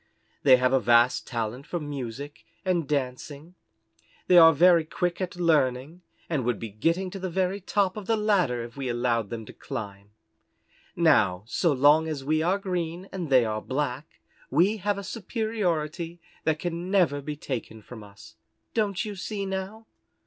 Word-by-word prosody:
They 130 -3 +7
have 125 +1 +1
a 135 - +5
vast 120 +2 +3
talent 120 +2 -4
for 175 - -3
music 145 -1 -6 0.2
and 175 -5 0
dancing; 140 +3 -4 0.7
they 180 - +4
are 165 -2 +9
very 170 +2 +5
quick 175 +3 -2
at 180 -1 -3
learning, 155 -2 +1 0.3
and 150 -6 -1
would 120 -2 0
be 115 - -6
getting 165 - -1
to 195 - -7
the 185 0 -3
very 190 +3 -1
top 195 0 0
of 210 -3 -7
the 225 - +2
ladder 185 - +1
if 115 0 -10
we 135 -2 -4
allowed 120 -3 0
them 115 -2 -6
to - - -12
climb. 100 -1 -7 0.9
Now, 90 +1 +3
so 160 +8 +1
long 145 +4 +4
as 150 -4 -4
we 155 +2 +1
are 180 +4 +2
green 180 -1 -4
and 180 -5 -5
they 130 -3 +5
are 110 -1 -2
black, 140 +1 -4 0.3
we 180 +10 +3
have 205 0 -1
a 200 - -5
superiority 180 - -3 0.3
that 160 -1 +2
can 175 +2 -4
never 170 -8 +2
be 150 +1 -5
taken 115 -6 -6
from 110 0 -11
us. 105 +2 -15 0.4
Don't 210 -1 0
you 210 -1 -5
see 200 +1 -4
now?" 195 +3 -5
155 Hz, 170 wpm, -26 LUFS, 125-185 Hz, 0.9 s, are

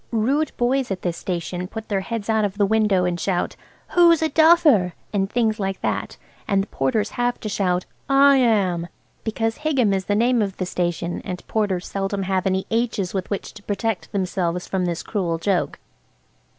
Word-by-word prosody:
Rude 265 +7 +1
boys 255 +2 +1
at 190 -2 -4
this 175 -2 -1
station 180 +1 -4
put 220 +3 -7
their 200 -3 0
heads 225 +1 -4
out 220 -1 +2
of 200 -1 -2
the 205 - +3
window 210 -3 +2
and 175 -1 -1
shout, 180 0 -1 0.3
"Who's 335 -2 +5
a 315 - +2
duffer?" 310 - +5 0.2
and 195 -1 0
things 225 -2 +1
like 195 -1 -2
that, - - -2 0.3
and 195 -1 +2
the - - -10
porters 215 -4 0
have 245 0 0
to - - -4
shout 185 -4 0 0.2
"I 275 0 +6
am!" 195 -9 +2 0.4
because 225 0 -1
Higham 265 -9 +2
is 190 -1 -1
the 205 - +1
name 240 +2 +3
of 195 -2 -2
the 185 - -2
station, 175 -1 -2
and 180 -2 -6
porters 200 -5 -1
seldom 195 0 -2
have 190 0 0
any 190 0 0
H's 225 -5 0
with 190 -2 -3
which 200 - -4
to 210 - -12
protect 205 0 -2
themselves 180 -2 -1
from 185 -2 -1
this 170 -1 -2
cruel 175 -6 -1
joke. 180 +2 0
200 Hz, 190 wpm, -22 LUFS, 185-230 Hz, 0.4 s, I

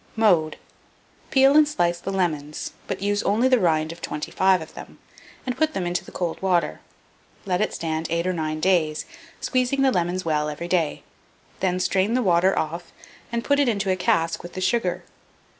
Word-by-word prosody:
Mode. 180 -9 +3 0.7
Peel 270 0 +5
and 305 -1 +7
slice 175 -12 0
the 185 - -5
lemons, 155 -6 -2 0.2
but - - -4
use 205 0 +1
only 225 +5 +2
the 255 -2 +4
rind 160 -4 +1
of 170 - -11
25 185 +5 +1
of 160 - -10
them, - - -11 0.5
and 255 -1 -2
put 315 -1 0
them 185 - -1
into 175 +1 -1
the - - -13
cold 175 -3 -3
water. 180 -3 +1 0.7
Let 180 -1 0
it 215 - +1
stand 160 -1 -3
8 170 +1 0
or 185 - 0
9 155 -2 -2
days, 155 -4 +1 0.3
squeezing 255 +1 +1
the 265 - +4
lemons 180 -2 -1
well 150 -1 0
every 150 +3 -5
day; 170 -4 0 0.6
then 185 -1 0
strain 195 +4 +1
the 255 - +2
water 185 0 +3
off 165 +2 -3 0.4
and 235 0 -2
put 285 0 +2
it 280 -3 +3
into 200 -3 0
a - - +2
cask 165 -2 +1
with 175 - -10
the - - -5
sugar. 185 -1 0
180 Hz, 190 wpm, -24 LUFS, 165-210 Hz, 0.7 s, and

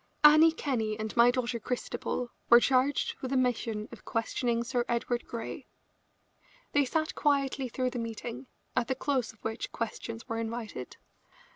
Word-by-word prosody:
Annie 310 +2 +9
Kenney 230 -9 -1
and 220 0 -4
my 235 0 +7
daughter 245 -1 0
Christabel 245 +1 -3 0.2
were 235 - +10
charged 265 +3 +2
with 260 - -3
the 270 - +1
mission 230 -4 0
of 235 - -11
questioning 235 +1 0
Sir 245 0 0
Edward 235 0 -1
Grey. 230 -1 -6 1.0
They 285 -1 +3
sat 310 +4 -1
quietly 275 -3 +1
through 255 +1 -1
the 245 - -3
meeting, 230 +3 -5 0.3
at 245 -2 +1
the 260 - 0
close 265 -3 0
of 220 - -27
which 225 +1 -3
questions 230 0 -5
were 225 0 -2
invited. 230 0 -5
245 Hz, 155 wpm, -30 LUFS, 230-265 Hz, 1.0 s, were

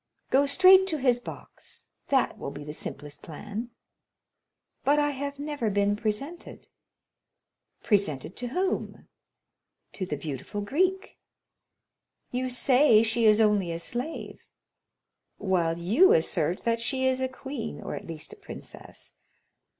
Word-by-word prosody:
"Go 280 +2 +4
straight 375 +5 +7
to 320 -4 -1
his 250 -3 +2
box; - - -10 0.2
that 270 -2 +1
will - - -4
be 145 +1 -8
the 150 0 -7
simplest 150 -1 -8
plan." 210 +8 -7 1.1
"But 285 +2 +3
I 290 0 +2
have 280 +1 -5
never 285 -5 -2
been 205 0 +1
presented." 235 +11 -5 1.2
"Presented 175 - 0
to 245 - -2
whom?" 370 +10 -2 0.8
"To 185 - -4
the 150 - -3
beautiful 145 +7 -5
Greek." 370 - -1 1.1
"You 255 +1 -2
say 250 -2 +5
she 230 +1 +2
is 215 0 +5
only 210 -5 +3
a 165 - -3
slave?" 245 - -5 1.0
"While 175 -4 0
you 215 - +5
assert 165 +1 +1
that 230 0 +1
she 260 +3 0
is 260 0 +1
a 260 - +1
queen, 260 -3 -6
or - - -6
at - - -7
least 160 - -7
a - - -13
princess. 400 - -11
235 Hz, 135 wpm, -27 LUFS, 190-280 Hz, 1.2 s, straight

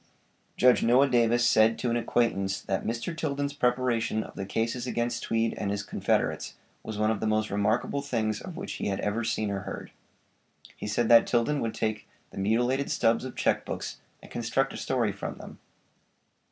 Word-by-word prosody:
Judge 125 0 +5
Noah 125 +4 +5
Davis 120 -1 +3
said 110 +1 +4
to 120 - -1
an - - +1
acquaintance 100 -5 0
that 95 0 -2
'Mr. 115 +8 -3
Tilden's 145 -3 -2
preparation 125 -4 +1
of - - -11
the 95 - -5
cases 115 +4 -1
against 120 -1 -1
Tweed 115 0 0
and 100 - -3
his 100 0 -2
confederates - - -1 0.3
was 110 -1 -6
one 110 +1 +2
of 105 - -1
the 110 - -1
most 110 0 +1
remarkable 110 +7 0
things 110 -6 -1
of 180 -2 -8
which - - -5
he - - -1
had 95 -1 -1
ever 105 +3 -1
seen 110 -2 -1
or 100 - -2
heard. - - -7 0.8
He - - -6
said 110 +2 +1
that 115 -1 +7
Tilden 125 +5 +1
would 115 -3 -2
take 110 -1 -2 0.2
the - - -7
mutilated 120 +7 +1
stubbs 115 +1 +2
of 130 - -7
check - - +1
books, - - -5 0.2
and - - -14
construct 125 +3 0
a - - -6
story 120 -5 0
from 100 - -6
them. - - -11
115 Hz, 190 wpm, -28 LUFS, 110-125 Hz, 0.8 s, that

